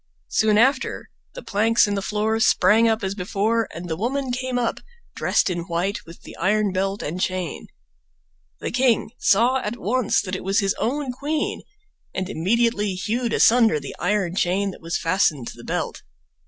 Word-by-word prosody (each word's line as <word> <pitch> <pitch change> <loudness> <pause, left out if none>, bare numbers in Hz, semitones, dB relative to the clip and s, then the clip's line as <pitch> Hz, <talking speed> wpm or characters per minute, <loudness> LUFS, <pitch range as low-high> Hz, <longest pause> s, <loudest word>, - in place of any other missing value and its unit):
Soon 215 -1 +3
after 260 +4 +1 0.2
the - - -8
planks 225 +3 +3
in 205 - -2
the 200 - -1
floor 215 +2 -1
sprang 220 +1 +4
up 220 -2 +1
as 190 0 -1
before, 210 +4 0
and 175 +1 -7
the 160 - -2
woman 255 +7 -2
came 255 0 -2
up, 240 -2 -1 0.4
dressed - - +1
in 180 -2 -1
white, 185 +4 -2
with 165 - -13
the - - -11
iron 205 +3 +1
belt 195 +2 -1
and 175 +5 -4
chain. 185 -4 -3 0.9
The - - -3
king 245 -2 +2
saw 235 +6 +3
at 235 -2 -4
once 245 +2 +1
that 185 0 -4
it - - -6
was 195 +1 +1
his 195 -1 +1
own 270 +3 -1
queen, 295 +4 -2 0.5
and 190 -1 -2
immediately 205 +2 +1
hewed 230 +5 -2
asunder 230 -8 +4
the 140 - -8
iron 180 -1 0
chain 195 +1 +1
that - - -13
was 165 0 -2
fastened 165 -7 +1
to - - -9
the - - -12
belt. - - -3
210 Hz, 180 wpm, -23 LUFS, 185-235 Hz, 0.9 s, sprang